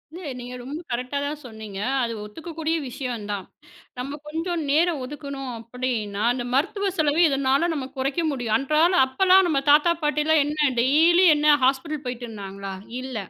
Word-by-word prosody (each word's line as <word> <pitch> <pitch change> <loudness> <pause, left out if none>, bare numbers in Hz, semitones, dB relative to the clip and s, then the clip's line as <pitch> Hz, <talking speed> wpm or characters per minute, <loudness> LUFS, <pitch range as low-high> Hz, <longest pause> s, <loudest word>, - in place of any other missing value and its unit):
இல்ல. 355 - -7 0.2
நீங்க 245 0 -8
ரொம்ப 290 +7 -6
கரெக்டா 250 +3 -2
தான் 295 +1 -4
சொன்னீங்க. 220 -4 -8 0.2
அது 230 -1 -2
ஒத்துக்க 315 +11 -10
கூடிய 320 0 0
விஷயம் 245 -4 -5
தான். 200 -2 -4 0.5
நம்ம 275 +3 -4
கொஞ்சம் 330 +2 -2
நேரம் 315 0 +2
ஒதுக்கணும் 280 -1 -6
அப்படின்னா, 230 -4 -3
இந்த 245 -1 -4
மருத்துவ 395 +9 +1
செலவை 310 +2 +2
இதனால 275 +3 +2
நம்ம 275 -4 -3
குறைக்க 275 +5 -1
முடியும். 245 -5 -2
அன்றாட 310 +6 +2
அப்பலாம் 375 +7 +5
நம்ம 290 -4 +2
தாத்தா, 300 +4 +6
பாட்டிலாம் 300 +1 +2
என்ன, 295 -1 +1
டெய்லி 325 +8 +5
என்ன 295 0 +5
ஹாஸ்பிடல் 280 +3 0
போயிட்டு 245 -1 -4
இருந்தாங்களா? 195 -2 -7 0.3
இல்ல. 260 -1 -7
275 Hz, 160 wpm, -24 LUFS, 245-310 Hz, 0.5 s, தாத்தா